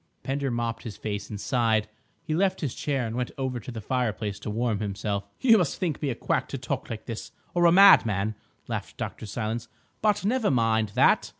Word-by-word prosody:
Pender 135 Hz, +1 st, -1 dB
mopped 120 Hz, -1 st, -2 dB
his 110 Hz, -4 st, -7 dB
face 105 Hz, -1 st, -4 dB
and 105 Hz, -, -6 dB
sighed. 110 Hz, -3 st, +1 dB, 0.4 s
He 160 Hz, -2 st, -2 dB
left 185 Hz, +3 st, +1 dB
his 145 Hz, -7 st, -2 dB
chair 135 Hz, -4 st, -1 dB
and 115 Hz, 0 st, -4 dB
went 125 Hz, 0 st, -1 dB
over 130 Hz, -2 st, -2 dB
to 115 Hz, -, -10 dB
the 115 Hz, -3 st, -6 dB
fireplace 110 Hz, -4 st, -2 dB
to -, -, -5 dB
warm 110 Hz, -1 st, 0 dB
himself. 100 Hz, -1 st, -3 dB
"You 230 Hz, -4 st, +6 dB
must 175 Hz, -6 st, 0 dB
think 165 Hz, -6 st, -2 dB
me 145 Hz, -, 0 dB
a 125 Hz, -, -2 dB
quack -, -, -1 dB
to -, -, -4 dB
talk -, -, -4 dB
like -, -, -6 dB
this, -, -, -6 dB, 0.2 s
or 175 Hz, 0 st, +3 dB
a -, -, +6 dB
madman," 110 Hz, -, +6 dB, 0.3 s
laughed -, -, -5 dB
Dr. 110 Hz, -, -5 dB
Silence. 110 Hz, +2 st, -3 dB, 0.3 s
"But 210 Hz, -2 st, +2 dB
never 230 Hz, +1 st, +2 dB
mind 110 Hz, -5 st, +2 dB
that. -, -, +4 dB
120 Hz, 205 wpm, -27 LUFS, 110-145 Hz, 0.4 s, You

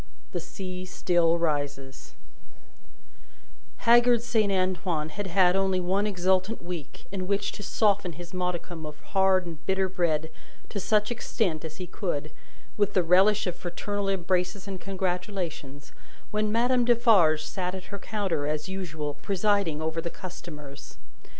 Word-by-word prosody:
The -, -, -2 dB
Sea 185 Hz, -2 st, -6 dB
Still 175 Hz, -2 st, +2 dB
Rises 145 Hz, -4 st, -3 dB, 1.7 s
Haggard 240 Hz, 0 st, +6 dB
Saint 220 Hz, -4 st, +2 dB
Antoine 185 Hz, -4 st, 0 dB
had 205 Hz, +5 st, -4 dB
had 180 Hz, 0 st, +4 dB
only 190 Hz, -1 st, +2 dB
one 190 Hz, +3 st, +1 dB
exultant 190 Hz, +2 st, +1 dB
week, 175 Hz, -4 st, -7 dB
in 185 Hz, -2 st, -3 dB
which 200 Hz, 0 st, 0 dB
to -, -, -8 dB
soften 205 Hz, -3 st, +1 dB
his 175 Hz, +3 st, -10 dB
modicum 180 Hz, -2 st, -3 dB
of 150 Hz, -1 st, -8 dB
hard 190 Hz, -1 st, +4 dB
and 165 Hz, -2 st, -8 dB
bitter 190 Hz, 0 st, +2 dB
bread 165 Hz, -4 st, 0 dB, 0.4 s
to 205 Hz, -, -3 dB
such 210 Hz, +2 st, +2 dB
extent 195 Hz, -8 st, -1 dB
as 160 Hz, -1 st, -7 dB
he 185 Hz, -, -5 dB
could, 160 Hz, -5 st, -3 dB, 0.5 s
with 205 Hz, -1 st, +1 dB
the 185 Hz, -, +4 dB
relish 190 Hz, +5 st, +5 dB
of 180 Hz, -, -2 dB
fraternal 200 Hz, +3 st, -3 dB
embraces 185 Hz, 0 st, 0 dB
and 190 Hz, -2 st, -5 dB
congratulations, 180 Hz, -7 st, -3 dB, 0.4 s
when 210 Hz, 0 st, +1 dB
Madame 245 Hz, +2 st, +3 dB
Defarge 220 Hz, -10 st, +5 dB
sat 180 Hz, +2 st, -3 dB
at 190 Hz, +2 st, -9 dB
her 200 Hz, -, -4 dB
counter, 185 Hz, -9 st, -1 dB
as 150 Hz, +2 st, -2 dB
usual, 160 Hz, -6 st, -4 dB
presiding 195 Hz, -1 st, 0 dB
over 160 Hz, +1 st, -1 dB
the 170 Hz, -, -3 dB
customers. 150 Hz, -6 st, -9 dB
185 Hz, 145 wpm, -27 LUFS, 165-200 Hz, 1.7 s, Haggard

